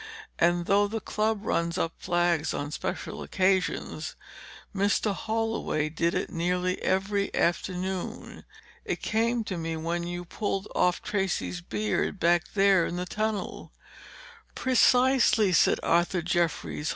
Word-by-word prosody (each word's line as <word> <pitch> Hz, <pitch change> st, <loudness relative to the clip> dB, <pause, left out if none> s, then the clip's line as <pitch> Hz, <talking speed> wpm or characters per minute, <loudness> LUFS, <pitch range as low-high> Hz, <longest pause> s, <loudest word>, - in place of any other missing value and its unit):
And 175 Hz, 0 st, +3 dB
though 205 Hz, +2 st, +3 dB
the 225 Hz, +2 st, -3 dB
club 215 Hz, -1 st, -1 dB
runs 170 Hz, -3 st, 0 dB
up 165 Hz, -2 st, -1 dB
flags 175 Hz, -3 st, +1 dB
on 145 Hz, +1 st, -4 dB
special 185 Hz, +4 st, -4 dB
occasions, 190 Hz, -1 st, 0 dB, 0.6 s
Mr. 200 Hz, +1 st, +1 dB
Holloway 220 Hz, -7 st, -1 dB
did 170 Hz, +2 st, 0 dB
it -, -, -2 dB
nearly 180 Hz, +2 st, -1 dB
every 200 Hz, +1 st, 0 dB
afternoon. 185 Hz, +1 st, -2 dB, 0.4 s
It -, -, -4 dB
came 230 Hz, +2 st, +1 dB
to 190 Hz, -4 st, -4 dB
me 165 Hz, 0 st, -3 dB
when 170 Hz, +2 st, -2 dB
you 175 Hz, 0 st, -5 dB
pulled 195 Hz, +2 st, -3 dB
off 180 Hz, 0 st, +1 dB
Tracey's 190 Hz, -3 st, -2 dB
beard 205 Hz, +1 st, -2 dB
back 170 Hz, 0 st, +3 dB
there 195 Hz, -3 st, +4 dB
in 170 Hz, -, -4 dB
the 180 Hz, 0 st, -3 dB
tunnel." 215 Hz, +3 st, -3 dB, 0.8 s
"Precisely," 250 Hz, -5 st, +4 dB
said 165 Hz, -, +4 dB
Arthur 175 Hz, +1 st, +2 dB
Jeffries. 170 Hz, -3 st, -1 dB
185 Hz, 125 wpm, -27 LUFS, 170-205 Hz, 0.8 s, there